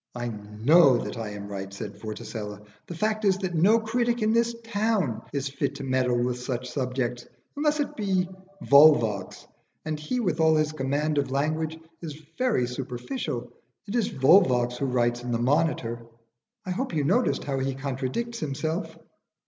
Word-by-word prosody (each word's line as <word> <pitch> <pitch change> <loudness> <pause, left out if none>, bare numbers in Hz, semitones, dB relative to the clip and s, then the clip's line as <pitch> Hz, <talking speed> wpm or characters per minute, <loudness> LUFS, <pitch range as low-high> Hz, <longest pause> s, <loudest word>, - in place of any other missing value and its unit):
"I 120 0 -3
know 115 +7 +4
that - - -4
I 115 -2 -4
am 100 -1 -7
right," 100 -1 -6
said 100 +1 -6
Vorticella. 105 -1 -6 0.2
"The 175 - -6
fact 215 +4 -1
is 195 -2 +3
that 190 -3 -3
no 190 +8 +5
critic 235 +1 0
in 215 +1 +3
this 235 0 +2
town 205 - 0
is 140 -1 -2
fit 140 0 -2
to - - -6
meddle 130 -2 +1
with 125 0 -1
such 125 0 -4
subjects, 125 -2 -2 0.3
unless 300 +1 +1
it 290 - -2
be 190 -4 0 0.4
Volvox, 120 -10 +5 0.4
and 155 -1 -3
he, 200 +12 -2
with 175 -8 0
all 160 0 +5
his 155 0 +2
command 145 +1 0
of 140 -2 -1
language, 155 +3 -1 0.2
is 155 -3 -7 0.2
very 250 - +2
superficial. 125 - -4 0.3
It 200 - -6
is 240 -2 +1
Volvox 130 -4 +4
who 140 - -1
writes 120 -1 +1
in 125 0 -4
the 115 - +1
'Monitor,' 120 -3 0 0.6
I 185 - -3
hope 215 0 -2
you 150 - +1
noticed 210 - +2
how 135 -2 -2
he 135 0 -1
contradicts 135 - -3
himself?" 155 +5 -3
140 Hz, 170 wpm, -26 LUFS, 125-185 Hz, 0.6 s, no